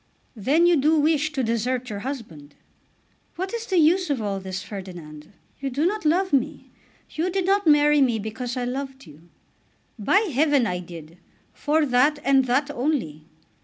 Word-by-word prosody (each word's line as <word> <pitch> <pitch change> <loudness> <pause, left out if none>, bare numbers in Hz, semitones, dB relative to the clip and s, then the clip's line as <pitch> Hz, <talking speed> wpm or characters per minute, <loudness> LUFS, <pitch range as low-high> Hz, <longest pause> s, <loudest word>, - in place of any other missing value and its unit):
"Then 275 - +2
you 345 -1 +4
do 305 +3 +3
wish 310 0 +1
to 265 -3 -1
desert 245 +2 -2
your 200 - -4
husband?" 200 - -8 0.8
"What 375 +4 -4
is 465 0 -4
the 375 - 0
use 345 +3 +3
of 280 -4 0
all 200 -2 -3
this, 190 0 -6
Ferdinand? 175 -6 -9 0.3
You 275 - -3
do 280 +5 -1
not 415 0 -1
love 360 +3 +1
me. 275 - -1 0.4
You 330 +4 -1
did 375 0 -1
not 395 0 +1
marry 295 -1 +5
me 245 -4 +2
because 235 +4 -5
I 250 - -2
loved 265 +1 -5
you." 160 +2 -17 0.7
"By 375 - +3
heaven 285 -2 +3
I 180 -4 -2
did; 170 -1 -11 0.3
for 305 +1 +1
that 280 +3 +3
and 270 -1 +4
that 275 +4 0
only." 240 - -3
265 Hz, 170 wpm, -24 LUFS, 205-310 Hz, 0.8 s, marry